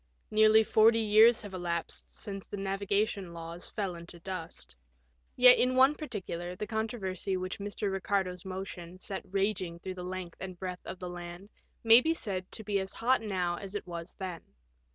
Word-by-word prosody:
Nearly 215 +1 +6
forty 220 +1 +5
years 220 +1 +6
have 205 -2 -8
elapsed 170 -2 -3
since 195 -2 -5
the 205 - -6
navigation 195 -1 -1
laws 170 +1 -7
fell 195 -4 -2
into 170 0 -10
dust. 165 - -7 0.6
Yet 250 0 +8
in 255 +1 +3
one 265 +3 +6
particular 185 - -5
the 210 - -4
controversy 205 -4 -2
which 185 +1 -4
Mr. 205 0 -3
Bicardo's 190 -2 -1
motion 185 -2 -7
set 195 0 -4
raging 195 -3 -1
through 185 +2 -6
the 180 -1 -7
length 180 -1 -6
and 185 -1 -6
breadth 180 0 -6
of 185 - -5
the 180 - -6
land 175 +2 -8 0.3
may 225 +1 +8
be 325 +4 +1
said 190 - -4
to 220 - -6
be 200 -1 0
as 190 -1 -5
hot 250 +2 +2
now 180 -5 -1
as 195 +2 -7
it 205 - -3
was 170 -1 -7
then. 185 -3 -5
190 Hz, 175 wpm, -31 LUFS, 180-215 Hz, 0.6 s, Yet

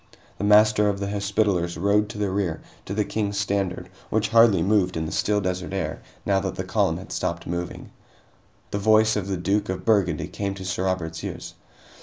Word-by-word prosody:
The - - -3
Master 105 0 +5
of 100 -1 -2
the 100 0 -3
Hospitallers 100 -4 0
rode 105 +3 +2
to 105 - -7
the 100 -2 -1
rear, 95 -5 -1 0.3
to 100 - -4
the 105 -1 +1
King's 100 -2 -2
standard, 100 -2 -1 0.2
which 110 0 +1
hardly 115 -6 +5
moved 95 -3 +2
in 80 - -2
the 80 - -5
still 105 +5 +1
desert 90 -1 -3
air, 85 -5 -3 0.2
now 100 -1 +2
that 95 -1 -3
the - - -3
column - - +1
had - - -10
stopped 85 0 -2
moving. 85 +1 -5 0.8
The 100 - -1
voice 110 +1 +4
of 100 -3 -2
the 95 -1 -1
Duke 100 +4 0
of 95 -1 -4
Burgundy 100 -6 +2
came 100 -1 -4
to 95 -1 -8
Sir 95 0 -2
Robert's 85 -3 -2
ears. - - -6
100 Hz, 200 wpm, -24 LUFS, 90-105 Hz, 0.8 s, Master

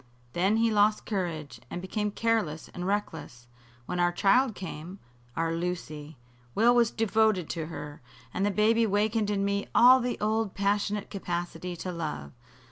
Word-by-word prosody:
Then 195 +5 +2
he 225 0 +3
lost 210 0 +3
courage, 170 -8 -4
and - - -5
became 210 +3 -2
careless 210 -8 -1
and 180 +1 -5
reckless. 160 -11 -3 0.4
When 180 - -3
our 175 0 +3
child 215 +6 +3
came 180 0 -7 0.4
our 165 0 0
Lucy 160 -4 -5 0.4
Will 235 +3 +5
was 240 -2 +4
devoted 220 -6 +1
to 160 -2 -4
her, 150 -3 -8 0.3
and 190 - -1
the 205 - +3
baby 220 +3 +3
wakened 210 +1 +1
in 200 -1 0
me 200 0 -1
all 255 +2 +8
the 245 -1 -2
old 215 -1 0
passionate 205 +1 -1
capacity 175 -2 -4
to 180 +2 -5
love. 150 - -5
195 Hz, 155 wpm, -28 LUFS, 175-215 Hz, 0.4 s, all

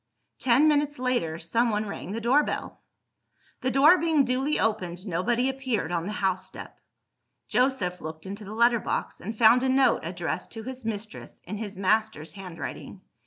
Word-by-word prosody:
Ten 265 +4 +4
minutes 290 -1 +2
later, 245 -11 -1
someone 215 +5 0
rang 200 -3 -6
the 215 +4 -3
door 250 +6 +4
bell. - - -5 0.8
The 255 - 0
door 290 +7 +6
being 315 -4 +3
duly 265 +4 0
opened, 185 -4 -1
nobody 230 +8 0
appeared 260 -8 -2
on 170 0 -1
the - - -3
house 190 -2 -1
step. - - -11 0.7
Joseph 245 -9 0
looked 160 +1 -8
into 200 +3 -7
the 205 +2 -8
letter 235 +1 +4
box, - - -3
and 220 +4 -6
found 235 +2 +6
a 260 - +1
note 265 0 +4
addressed - - -4
to 225 -1 -7
his 260 0 -7
mistress, 215 -1 -5
in 210 +4 -5
his 205 -3 -6
master's 215 -4 0
handwriting. 185 -4 -8
225 Hz, 165 wpm, -26 LUFS, 195-260 Hz, 0.8 s, door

